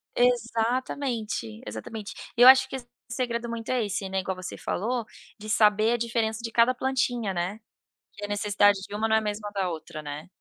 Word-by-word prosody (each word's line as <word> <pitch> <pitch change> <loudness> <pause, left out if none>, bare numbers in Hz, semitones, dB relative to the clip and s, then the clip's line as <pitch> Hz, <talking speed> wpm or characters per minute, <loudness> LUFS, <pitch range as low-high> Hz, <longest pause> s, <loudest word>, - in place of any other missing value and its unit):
Exatamente, 235 - 0
exatamente. 200 - -7 0.2
E - - +2
eu 245 - +10
acho 265 0 +8
que - - -5
esse 245 -2 -8 0.2
segredo 240 -1 -2
muito 230 -1 -5
é 255 -2 +1
esse, 195 -1 -3
né, 190 0 -1
igual 190 0 -3
você 185 0 -7
falou, 235 +3 -2 0.3
de 215 - -8
saber 215 +1 +4
a - - +1
diferença 225 -1 -1
de 230 - -4
cada 235 +3 +4
plantinha, 245 -5 0
né, 180 +4 -3 0.5
que 205 - -6
a - - -6
necessidade 205 -1 +3
de 205 - -7
uma 220 +2 0
não 220 - +3
é 220 - +5
a - - -5
mesma 210 -1 -4
da 195 -3 -1
outra, 155 -1 -7
né. 150 +2 -7
220 Hz, 200 wpm, -27 LUFS, 200-240 Hz, 0.5 s, eu